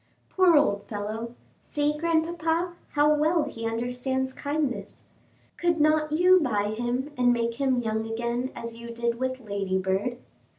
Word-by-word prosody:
"Poor 365 -4 +5
old 205 -9 +2
fellow! 220 +3 -5 0.2
see, 295 0 -1
grandpapa, 330 +1 0 0.2
how 295 +1 +4
well 310 +2 +2
he 225 0 -4
understands 250 +3 -2
kindness. 285 -3 -3 0.5
Could 345 -2 +1
not 305 0 +3
you 360 +4 +6
buy 210 - 0
him 245 +5 -2
and 245 0 +5
make 235 +1 -1
him 265 -2 +2
young 220 -1 -2
again 235 +2 -2
as 230 0 -6
you 235 0 -8
did 235 0 -2
with 260 0 -2
Ladybird?" 195 +1 -1
250 Hz, 140 wpm, -26 LUFS, 230-300 Hz, 0.5 s, you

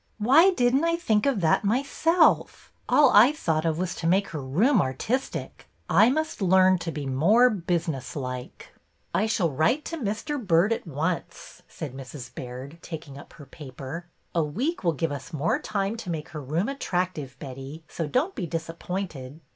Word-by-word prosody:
Why 275 - +6
did 245 -9 +2
n't 275 +4 +3
I 335 0 +2
think 220 -10 +1
of 255 -8 +1
that 160 +4 +3
myself! 280 - +2 0.2
All 290 -3 +6
I 225 +7 +7
thought 165 - -1
of 160 -1 0
was 180 0 -2
to 165 - -2
make 195 +3 +2
her 155 -3 -5
room 195 - +3
artistic. 190 - -3 0.2
I 220 - +6
must 310 -2 -2
learn 185 0 +5
to 165 0 -4
be 150 -3 -5
more 200 - +4
business 170 -7 -2
like." 125 -3 -6 0.2
'' - - -42
I 215 - +1
shall 185 -7 +1
write 160 - +1
to 330 - -4
Mr. 245 +3 -3
Byrd 185 +3 +3
at 225 - -6
once," 160 +4 -4
said 150 -6 -7
Mrs. 130 -2 -9
Baird, 130 +6 -8
taking 160 -5 -8
up - - -14
her 145 - -12
paper. 140 +3 -8
" - - -43
A 170 - +2
week 240 - -2
will 170 -2 +2
give 160 +1 -2
us 140 +3 -7
more 155 +2 0
time 200 +1 -2
to 215 -5 -7
make 160 -3 -4
her 155 - -7
room 155 - -1
attractive, 180 - -3
Betty, 135 +3 -8
so 165 - -4
don't 285 - 0
be 185 -8 -4
disappointed." 165 -3 -5
170 Hz, 185 wpm, -26 LUFS, 150-225 Hz, 0.2 s, I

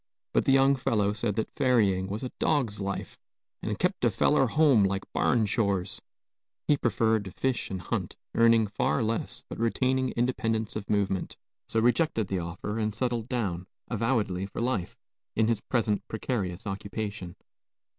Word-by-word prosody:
But - - +2
the - - +4
young 135 +1 +5
fellow 105 -5 +1
said 105 -1 -2
that 110 - -2
ferrying 105 -9 +3
was 100 +5 -4
a 125 - -4
dog's 125 -10 +1
life, 100 0 -4 0.4
and - - -2
"kept - - 0
a - - +5
feller - - +3
home 145 -9 +4
like 95 0 0
barn 115 -3 +2
chores;" 100 -3 -1 0.7
he 150 - +5
preferred 110 -3 +1
to 95 - -7
fish 130 +5 -1
and 95 - -3
hunt, - - -3 0.2
earning 115 -1 +5
far 110 +5 0
less 110 +1 -2
but - - -8
retaining 130 +3 +1
independence 115 -3 0
of 105 -1 -5
movement, 100 -2 0 0.3
so 110 - +1
rejected 120 - +2
the 95 - 0
offer 90 +6 -4
and 105 -1 -1
settled 120 0 -1
down, 95 -8 -2 0.2
avowedly 105 -5 0
for - - -7
life, 115 -7 -1 0.4
in 110 0 +3
his 115 -2 +1
present 110 -5 0
precarious 100 -5 -3
occupation. 100 -2 -5
110 Hz, 160 wpm, -28 LUFS, 100-120 Hz, 0.7 s, young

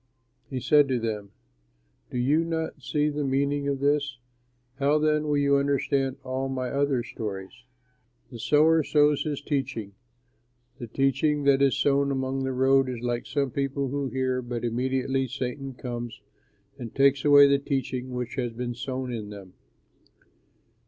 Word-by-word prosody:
He 130 - -3
said 145 +3 +4
to 130 -2 0
them, 105 -3 -3 0.8
"Do - - -5
you 145 +7 +2
not 160 -2 -3
see 150 +2 0
the 150 0 -2
meaning 140 +1 0
of 140 -1 -1
this? 145 -2 +1 0.6
How 140 +2 +3
then 150 0 +1
will 145 -1 +1
you 140 0 +3
understand 140 -1 0
all 130 +1 -3
my 130 -1 -3
other 140 -3 +1
stories? 105 +1 -7 0.7
The 120 - -9
sower 155 +6 +4
sows 150 -1 +3
his 145 -2 -3
teaching. 130 -9 -3 0.9
The 120 - -6
teaching 140 +4 +1
that 140 -1 +4
is 135 -1 +3
sown 140 0 +2
along 135 0 -1
the 130 - -1
road 130 +1 +3
is 120 -2 -5
like 120 0 -2
some 140 -3 -1
people 140 +1 -2
who 140 +1 -2
hear 130 -1 -1
but 120 -1 -4
immediately 130 +2 0
Satan 135 +1 -5
comes 120 -3 -6 0.6
and 120 -3 -7
takes 135 0 +4
away 145 -1 +8
the 140 0 +3
teaching 130 -2 -3
which 125 +1 -5
has 120 -3 -2
been 120 +1 -4
sown 130 +1 -4
in 110 -3 -5
them. 100 -3 -11
135 Hz, 160 wpm, -26 LUFS, 125-140 Hz, 0.9 s, away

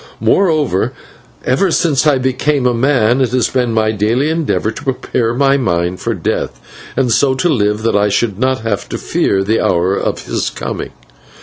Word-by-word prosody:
Moreover, 155 - +1 0.5
ever 135 +10 +2
since 155 -3 +1
I 145 -3 +4
became 130 +2 0
a 125 - +3
man 125 -1 +2
it 130 - +2
has 125 -3 +2
been 125 -2 0
my 110 -1 +1
daily 115 +8 0
endeavour 160 -8 -1
to 110 - -9
prepare 125 -3 -1
my 140 +1 +3
mind 90 -6 -1
for - - -2
Death, 60 - -3 0.4
and 130 -3 +1
so 135 +2 +3
to 135 - 0
live 105 -6 0
that 115 - +1
I 105 0 +3
should 100 0 -1
not 130 0 0
have 110 -4 -3
to - - -3
fear 95 0 0
the 110 +3 +1
hour 90 +3 +1
of - - -3
his - - -2
coming. - - -5
125 Hz, 185 wpm, -15 LUFS, 105-135 Hz, 0.5 s, I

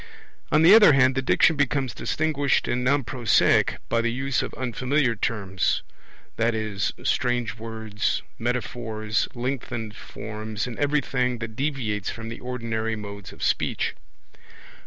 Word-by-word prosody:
On 155 +1 +5
the 175 +5 +9
other 210 -8 +8
hand 130 -1 +5
the 135 - 0
Diction 160 +4 +4
becomes 140 -2 0
distinguished 145 -3 0
and 125 +1 0
non 140 +2 +2
prosaic 120 -1 +3
by 115 - +1
the 115 0 0
use 135 +1 -1
of - - -4
unfamiliar 130 +1 0
terms, 100 -4 -1 0.6
i.e. 110 -3 0 0.2
strange 120 -4 0
words, 110 -2 -2 0.2
metaphors, 115 -2 -1
lengthened 120 -3 -4
forms, 110 +1 -6
and 125 -3 -7
everything 135 -4 +1
that 110 -1 -6
deviates 120 -7 -2
from 115 0 -6
the 115 - -7
ordinary 115 -3 -3
modes 100 -2 -8
of - - -9
speech. - - 0
120 Hz, 135 wpm, -25 LUFS, 110-135 Hz, 0.6 s, the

